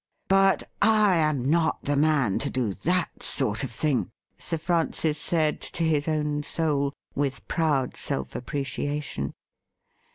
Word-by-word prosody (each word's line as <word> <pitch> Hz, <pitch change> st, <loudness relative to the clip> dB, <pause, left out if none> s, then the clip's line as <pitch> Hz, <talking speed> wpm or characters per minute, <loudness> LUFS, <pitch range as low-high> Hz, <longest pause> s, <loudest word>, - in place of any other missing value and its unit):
' -, -, -49 dB
But 195 Hz, 0 st, +4 dB, 0.2 s
I 210 Hz, -3 st, +5 dB
am 155 Hz, -5 st, +1 dB
not 160 Hz, +2 st, +1 dB
the 145 Hz, -, 0 dB
man 140 Hz, -8 st, +2 dB
to 140 Hz, -, -1 dB
do 120 Hz, -6 st, -1 dB
that 175 Hz, -, -1 dB
sort 110 Hz, -5 st, 0 dB
of 135 Hz, -, -2 dB
thing,' 145 Hz, -5 st, 0 dB, 0.3 s
Sir 165 Hz, -, -1 dB
Francis 160 Hz, -2 st, 0 dB
said 155 Hz, -1 st, +1 dB
to 170 Hz, -, -2 dB
his 155 Hz, -2 st, +1 dB
own 150 Hz, -1 st, 0 dB
soul, 145 Hz, -2 st, 0 dB, 0.2 s
with 140 Hz, -1 st, -2 dB
proud 150 Hz, -6 st, 0 dB
self 65 Hz, -1 st, -3 dB
appreciation. 140 Hz, -, -3 dB
150 Hz, 140 wpm, -26 LUFS, 135-165 Hz, 0.3 s, I